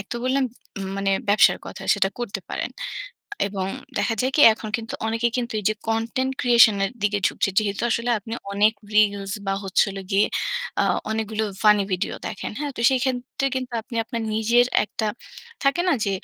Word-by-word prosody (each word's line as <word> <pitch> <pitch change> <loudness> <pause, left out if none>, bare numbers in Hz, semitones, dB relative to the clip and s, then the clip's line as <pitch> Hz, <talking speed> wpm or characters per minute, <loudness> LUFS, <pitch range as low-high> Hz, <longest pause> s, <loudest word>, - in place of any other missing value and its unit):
১ 200 - -7
তো - - -3
বললাম 265 +1 +2 0.3
উম 195 - -4
মানে 195 0 0 0.2
ব্যবসার 210 +2 +5
কথা - - -8
সেটা 195 - +2
করতে 240 -4 -4
পারেন - - -3 0.8
এবং 190 -2 -3 0.3
দেখা 205 +3 +1
যায় 260 +1 0
কি? - - +4
এখন 220 - -8
কিন্তু 230 -1 -7
অনেকে 230 +1 +1
কিন্তু 240 -2 -2
এইযে 215 +2 +1
কনটেন্ট 230 +4 0
ক্রিয়েশন 235 -4 +6
এর 195 - -1
দিকে 205 0 +2
ঝুকছে। - - 0
যেহেতু 205 -2 -1
আসলে 235 +2 0
আপনি 225 +2 -10 0.2
অনেক 210 +2 +4 0.2
রিলস 200 -2 +3
বা, 195 - +1
হচ্ছে 190 - +3
হলো 195 0 -6
গিয়ে 195 +2 +4 0.6
আ - - +2 0.3
অনেকগুলো 220 0 -1 0.2
ফানি 210 -1 +6
ভিডিও 180 - -1
দেখেন, 200 - -5
হ্যাঁ? 290 -1 -2
তো - - -4
সেইক্ষেত্রে 260 +1 -1
কিন্তু 255 -1 -4
আপনি 235 0 -8
আপনার 235 -1 -4
নিজের 235 +3 +4 0.2
একটা 215 +1 -4 0.6
থাকে 275 +5 +3
না? 360 - +4
যে 200 - 0
220 Hz, 180 wpm, -23 LUFS, 205-245 Hz, 0.8 s, ক্রিয়েশন